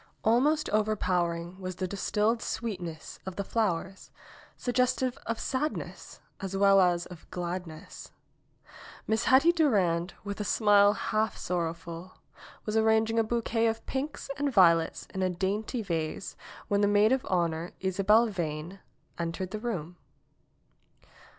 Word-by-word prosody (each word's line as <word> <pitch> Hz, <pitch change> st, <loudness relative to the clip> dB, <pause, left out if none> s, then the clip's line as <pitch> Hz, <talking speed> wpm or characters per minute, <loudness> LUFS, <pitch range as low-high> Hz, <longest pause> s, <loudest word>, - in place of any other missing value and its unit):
Almost 285 Hz, +8 st, +3 dB
overpowering 180 Hz, -4 st, 0 dB
was 185 Hz, -1 st, -5 dB
the 185 Hz, 0 st, -3 dB
distilled 210 Hz, +4 st, 0 dB
sweet 220 Hz, -6 st, -3 dB
ness 165 Hz, -2 st, -7 dB
of 190 Hz, -, -5 dB
the 200 Hz, -, -2 dB
flowers, 195 Hz, -3 st, -2 dB, 0.5 s
suggestive 250 Hz, 0 st, +1 dB
of 230 Hz, -1 st, -2 dB
sadness 290 Hz, +4 st, -4 dB, 0.2 s
as 195 Hz, -1 st, -4 dB
well 195 Hz, 0 st, +6 dB
as 175 Hz, -1 st, +2 dB
of 175 Hz, -2 st, -13 dB
gladness. 175 Hz, -1 st, -6 dB, 0.9 s
Miss 220 Hz, +1 st, 0 dB
Hetty 275 Hz, +6 st, +6 dB
Durand, 195 Hz, -, +1 dB
with 200 Hz, 0 st, -5 dB
a -, -, -1 dB
smile 205 Hz, 0 st, +5 dB
half 215 Hz, +1 st, -1 dB
sorrowful, 170 Hz, 0 st, -4 dB, 0.5 s
was 215 Hz, -, -2 dB
arranging 220 Hz, 0 st, +3 dB
a -, -, +4 dB
bouquet 230 Hz, 0 st, 0 dB
of 225 Hz, 0 st, -2 dB
pinks 275 Hz, +3 st, -4 dB
and 285 Hz, -1 st, +1 dB
violets 170 Hz, -7 st, +4 dB
in 190 Hz, -, -3 dB
a 185 Hz, -, +2 dB
dainty 205 Hz, +6 st, -2 dB
vase 165 Hz, 0 st, -3 dB, 0.3 s
when 200 Hz, 0 st, +1 dB
the 205 Hz, -, +4 dB
maid 205 Hz, +2 st, +4 dB
of 265 Hz, -1 st, +2 dB
honor, 170 Hz, -2 st, 0 dB
Isabel 195 Hz, +4 st, +3 dB
Veyne, 170 Hz, -1 st, -4 dB, 0.4 s
entered 170 Hz, +2 st, -3 dB
the 215 Hz, -, -4 dB
room. 180 Hz, -7 st, -4 dB
200 Hz, 135 wpm, -29 LUFS, 175-225 Hz, 0.9 s, well